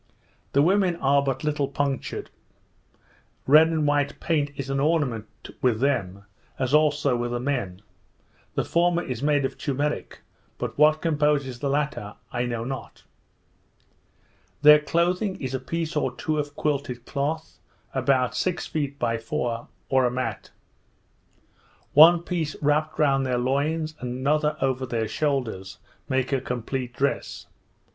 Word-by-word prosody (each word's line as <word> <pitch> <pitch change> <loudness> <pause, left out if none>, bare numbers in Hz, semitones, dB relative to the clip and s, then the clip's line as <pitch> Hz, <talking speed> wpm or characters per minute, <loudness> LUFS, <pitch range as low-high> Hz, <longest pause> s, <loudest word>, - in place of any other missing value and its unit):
The 140 - +5
women 185 0 +3
are 140 -2 +3
but 135 -1 -2
little 150 -2 0
punctured; 140 -1 -3 1.1
red 155 +4 +7
and 160 -2 0
white 145 -1 +1
paint 150 -4 0
is 135 - -5
an 135 - 0
ornament 140 -8 0 0.3
with 120 -4 +2
them, 105 -8 -1 0.3
as 130 0 -1
also 150 -3 +3
with 120 0 -2
the 120 0 -2
men; 120 -8 -3 0.7
the - - 0
former 175 0 +2
is 125 -3 -5
made 145 -1 +2
of - - -5
turmeric, 145 +1 -2 0.4
but - - -4
what 155 +1 +4
composes 145 -5 +1
the 140 - -1
latter 140 -7 -2 0.2
I 120 0 -1
know 115 -1 -3
not. 130 -1 -7 1.6
Their 150 0 +9
clothing 180 +6 0
is 130 -1 -4
a 130 - -1
piece 165 +5 -3
or 130 -4 0
two 155 +2 -1
of 145 -1 -4
quilted 140 -5 -2
cloth, 155 +3 -3 0.3
about 130 -3 +1
six 180 -2 -1
feet 145 -2 -3
by 115 -3 0
four, 120 -1 -3 0.2
or 130 -1 +3
a - - -1
mat. 130 +1 -4 1.4
One 165 +3 +8
piece 165 -4 -2
wrapped 150 +1 +1
round 140 -3 +3
their 125 -2 0
loins, 150 +5 0
and 125 0 -4
another 150 +3 +1
over 130 -1 0
their 115 -2 -1
shoulders, 120 -10 -2 0.3
make 130 +1 0
a 135 - +1
complete 125 0 -3
dress. 140 +1 -2
140 Hz, 145 wpm, -25 LUFS, 125-150 Hz, 1.6 s, Their